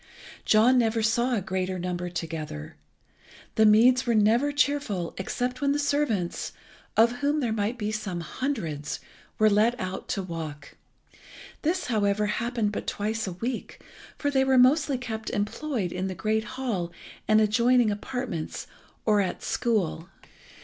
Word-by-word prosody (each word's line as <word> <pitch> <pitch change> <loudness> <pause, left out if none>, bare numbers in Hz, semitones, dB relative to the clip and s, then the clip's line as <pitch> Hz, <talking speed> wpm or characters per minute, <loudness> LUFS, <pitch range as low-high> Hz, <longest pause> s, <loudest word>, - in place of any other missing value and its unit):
John 235 +4 +5
never 225 -1 +1
saw 235 +3 +2
a 210 - 0
greater 185 0 -2
number 180 0 -3
together. 155 - -5 0.8
The 220 0 +5
meads 245 +5 +5
were 235 - +3
never 230 +7 +3
cheerful 285 - 0
except 250 +7 -2
when 280 0 +2
the - - 0
servants, 285 -11 -1 0.4
of 230 +2 +6
whom 290 +2 +1
there 240 -6 0
might 220 +3 -1
be 210 -2 -2
some 195 -5 -3
hundreds, 165 - -3 0.4
were 215 - +5
let 220 +4 +3
out 185 -1 -4
to 195 - -2
walk. 160 -4 -7 0.9
This, 350 +4 0
however, 210 -3 +1
happened 230 0 -1
but - - -5
twice 215 +1 -2
a 185 - -3
week, 235 +7 -5 0.4
for 285 - -1
they 265 -1 +3
were 265 -1 +3
mostly 275 +2 +4
kept 225 -3 -5
employed 210 - -2
in 185 +1 -2
the 190 - -4
great 220 +4 0
hall 200 -10 -2 0.4
and 215 0 +5
adjoining 235 +2 +4
apartments 210 -5 -4 0.4
or 210 -2 +4
at 190 - -3
school. 190 -7 -1
220 Hz, 150 wpm, -27 LUFS, 190-250 Hz, 0.9 s, of